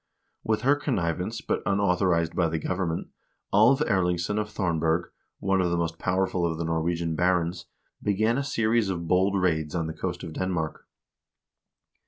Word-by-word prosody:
With 110 +1 0
her 140 +3 +5
connivance, 90 - -2
but - - -2
unau 100 -2 +2
thorized 85 -3 +1
by 85 -3 +1
the 80 - -1
government, 85 0 -2 0.4
Alv 120 +8 +5
Erlingsson 95 - +1
of 105 0 -2
Thornberg,2 85 -4 0 0.3
one 95 -1 +1
of 90 - +1
the 85 - 0
most 85 -1 -2
powerful 90 -1 0
of 80 -1 0
the 85 - -2
Norwegian 80 0 -1
barons, 85 0 0 0.3
began 110 +5 +1
a - - -1
series 115 -4 +1
of 85 -3 -3
bold 95 +3 +3
raids 80 -3 0
on 85 -2 0
the 80 - -4
coast 90 +2 -4
of 80 -3 -6
Denmark. 85 -4 -3
90 Hz, 165 wpm, -26 LUFS, 85-100 Hz, 0.4 s, her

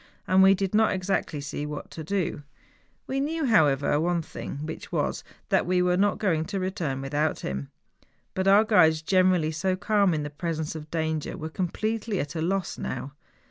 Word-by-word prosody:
And 185 +1 +5
we 195 +1 +7
did 195 0 -2
not 220 0 +4
exactly 185 -5 -1
see 145 +1 -5
what 150 -1 -7
to 160 - -7
do. 175 -2 -2 0.6
We 270 - -2
knew, 315 +3 -1
how¬ 210 - +5
ever, 140 +2 0
one 170 +1 0
thing, 150 -1 -7
which 160 - -7
was, - - -1 0.3
that - - +2
we 180 0 +2
were 180 0 +2
not 200 +2 +2
going 165 -6 0
to 195 +3 -3
return 170 -8 -2
without 150 +3 -1
him. 70 +1 -4 0.6
But 190 0 -1
our 200 +2 +7
guides, 160 -8 +4
generally 185 -3 +3
so 185 +4 0
calm 200 -2 +2
in 150 - -2
the 145 - -5
presence 160 0 -3
of 155 -1 -8
danger, 160 -1 -2
were 160 -2 -5
completely 210 +4 -2
at 145 +2 -3
a 160 - -3
loss 190 +3 -1
now. 135 +2 -5
175 Hz, 190 wpm, -26 LUFS, 155-195 Hz, 0.6 s, we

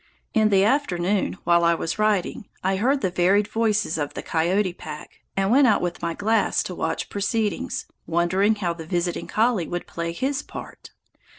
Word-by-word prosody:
In 215 -1 +4
the 195 -2 +4
afternoon, 200 -7 +1
while 170 0 +4
I 170 0 +4
was 165 +4 -3
writing, 210 -2 0 0.2
I 190 +1 +1
heard 265 +7 +2
the 185 - 0
varied 190 +4 +3
voices 210 -6 0
of 145 -1 -3
the - - -5
coyote 180 +3 +1
pack, 155 -3 -9 0.2
and 195 +1 +2
went 270 +2 +6
out 215 - +4
with 175 -1 -3
my 170 -1 -2
glass 220 +2 +1
to - - -5
watch - - -2
proceedings, 210 +1 -2 0.2
wondering 180 +6 +2
how 180 -5 -1
the 165 -1 -9
visiting 175 0 -2
collie 220 -6 +1
would 175 0 -4
play 170 0 -4
his 270 +10 -1
part. - - -10
190 Hz, 180 wpm, -24 LUFS, 170-215 Hz, 0.2 s, went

